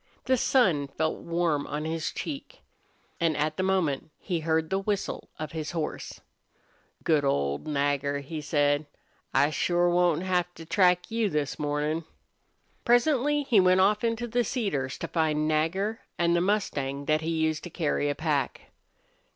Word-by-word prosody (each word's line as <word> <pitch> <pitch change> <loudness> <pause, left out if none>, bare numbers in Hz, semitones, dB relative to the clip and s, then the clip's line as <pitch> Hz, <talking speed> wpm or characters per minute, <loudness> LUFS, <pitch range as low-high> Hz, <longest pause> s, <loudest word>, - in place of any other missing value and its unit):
The 260 - +3
sun 190 - +2
felt 160 +3 -2
warm 170 -4 0
on 150 +1 -3
his 160 0 -2
cheek. 315 - -7 0.6
And 165 -3 +1
at 150 +1 0
the - - 0
moment 175 -6 0
he 175 -4 -2
heard 160 +1 0
the 190 - +2
whistle 200 0 -3
of 155 -1 -5
his 160 0 -4
horse. 160 -3 -4 0.8
"Good 155 -3 +3
old 70 - 0
Nagger!" 140 -1 0
he 155 +2 -6
said. 145 0 +1 0.4
"I 145 - +3
shore 175 +2 +2
won't 175 -1 +2
have 180 -1 0
to 165 - -10
track 180 +1 +3
you 225 -2 +1
this 150 -4 -2
mornin'." 150 +2 -1 0.8
Presently 285 +4 +3
he 240 -6 +4
went 185 0 +5
off 210 +3 +3
into 230 +1 0
the 240 +1 +1
cedars 170 - -2
to - - -4
find 155 -2 +1
Nagger 180 +8 0 0.2
and 170 0 +2
the 170 - +2
mustang 145 -9 -1
that 155 +1 +2
he 160 - -3
used 160 -1 0
to - - -6
carry 150 -3 0
a 145 - -1
pack. 145 -4 -2
165 Hz, 160 wpm, -27 LUFS, 150-190 Hz, 0.8 s, went